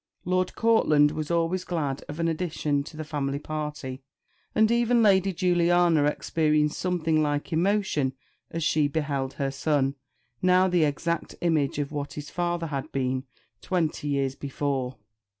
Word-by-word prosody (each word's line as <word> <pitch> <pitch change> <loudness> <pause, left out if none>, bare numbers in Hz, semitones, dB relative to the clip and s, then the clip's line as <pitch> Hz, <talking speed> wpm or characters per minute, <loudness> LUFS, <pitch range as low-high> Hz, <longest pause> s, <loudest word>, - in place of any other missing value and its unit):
Lord 185 0 0
Courtland 155 -11 +4
was 155 -1 -4
always 170 +2 +1
glad 145 -7 -2
of 150 +2 -6
an 165 - +1
addition 155 -3 -1
to 155 - -11
the 155 - -4
family 140 -2 -2
party; 150 -3 -5 0.5
and 220 +1 +4
even 235 0 +3
Lady 195 -2 +4
Juliana 175 -3 +3
experienced 150 0 +1
something 165 -4 +1
like 145 +2 -1
emotion 170 -6 +1 0.4
as 165 0 -3
she 155 -1 +2
beheld 140 -3 -2
her 140 -2 -2
son, 140 -1 +1 0.5
now 185 +1 +4
the 175 -3 +3
exact 170 +3 -2
image 155 -6 +1
of 145 -1 -2
what 145 -1 -4
his 145 -1 -7
father 175 -1 -1
had 145 -1 -4
been 130 0 -1 0.4
twenty 165 -5 -1
years 140 -2 0
before. 135 -2 -3
155 Hz, 150 wpm, -26 LUFS, 145-175 Hz, 0.5 s, Courtland